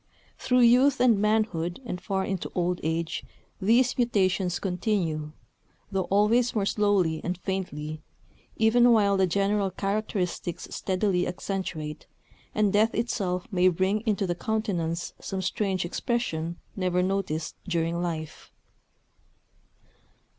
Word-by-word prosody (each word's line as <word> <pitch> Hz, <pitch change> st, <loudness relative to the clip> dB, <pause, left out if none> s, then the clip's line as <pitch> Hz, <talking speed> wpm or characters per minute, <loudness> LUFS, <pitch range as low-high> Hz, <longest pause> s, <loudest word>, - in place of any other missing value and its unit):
Through 250 Hz, 0 st, +3 dB
youth 250 Hz, +3 st, +5 dB
and 235 Hz, -5 st, +4 dB
manhood 210 Hz, -6 st, 0 dB
and 180 Hz, -6 st, -5 dB
far 190 Hz, -1 st, -1 dB
into 190 Hz, -2 st, -3 dB
old 180 Hz, 0 st, 0 dB
age 160 Hz, +1 st, -2 dB, 0.4 s
these 240 Hz, +6 st, +3 dB
mutations 190 Hz, -6 st, +1 dB
continue, 180 Hz, -5 st, -1 dB, 0.6 s
though 190 Hz, -2 st, 0 dB
always 220 Hz, +6 st, +3 dB
more 205 Hz, -2 st, +1 dB
slowly 200 Hz, -6 st, +1 dB
and 180 Hz, 0 st, -2 dB
faintly, 155 Hz, -5 st, -4 dB, 0.5 s
even 240 Hz, +2 st, +5 dB
while 200 Hz, -3 st, +4 dB
the 190 Hz, -1 st, +3 dB
general 200 Hz, +2 st, +1 dB
characteristics 190 Hz, -3 st, -2 dB
steadily 185 Hz, -1 st, 0 dB
accentuate; 175 Hz, -5 st, -4 dB, 0.5 s
and 210 Hz, -2 st, +2 dB
death 215 Hz, +2 st, +3 dB
itself 190 Hz, -6 st, -1 dB
may 185 Hz, -1 st, +4 dB
bring 190 Hz, +4 st, +2 dB
into 205 Hz, -2 st, +1 dB
the 175 Hz, -, 0 dB
countenance 175 Hz, -5 st, -2 dB
some 190 Hz, -1 st, -4 dB
strange 190 Hz, -1 st, -1 dB
expression 170 Hz, -5 st, -2 dB, 0.2 s
never 180 Hz, -2 st, +1 dB
noticed 185 Hz, -5 st, -1 dB
during 170 Hz, -1 st, 0 dB
life. 160 Hz, -3 st, -5 dB
190 Hz, 120 wpm, -27 LUFS, 175-210 Hz, 0.6 s, youth